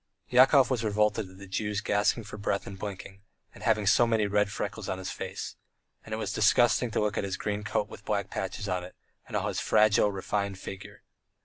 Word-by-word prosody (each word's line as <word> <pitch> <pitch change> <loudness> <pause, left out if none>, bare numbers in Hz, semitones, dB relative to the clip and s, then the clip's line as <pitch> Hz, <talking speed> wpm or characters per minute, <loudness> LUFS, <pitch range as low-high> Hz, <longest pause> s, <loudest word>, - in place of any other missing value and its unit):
Yakov 130 +2 +6
was 120 -3 0
revolted 105 -1 +1
at 95 - -15
the 100 - -10
Jew's 105 +2 -2
gasping 105 +2 +1
for 105 - -9
breath 100 -1 -1
and 95 -1 -8
blinking, 100 -1 -7 0.3
and - - -13
having 110 -2 +2
so 120 +4 +5
many 110 -2 +2
red 105 0 +2
freckles - - -4
on 95 - -2
his 95 - -5
face. - - -6 0.5
And - - -13
it 110 - -1
was 110 - -3
disgusting 120 +2 +4
to 110 - -1
look 105 -1 0
at - - -1
his 95 -2 -3
green 105 0 -3
coat 105 0 -1
with 105 - -12
black 100 -2 -2
patches 100 +3 -4
on 90 -1 -1
it, 90 - -11 0.3
and - - -2
all - - -1
his - - -2
fragile, 105 -1 +4
refined 100 0 -2
figure. 95 0 -9
105 Hz, 215 wpm, -28 LUFS, 100-110 Hz, 0.5 s, Yakov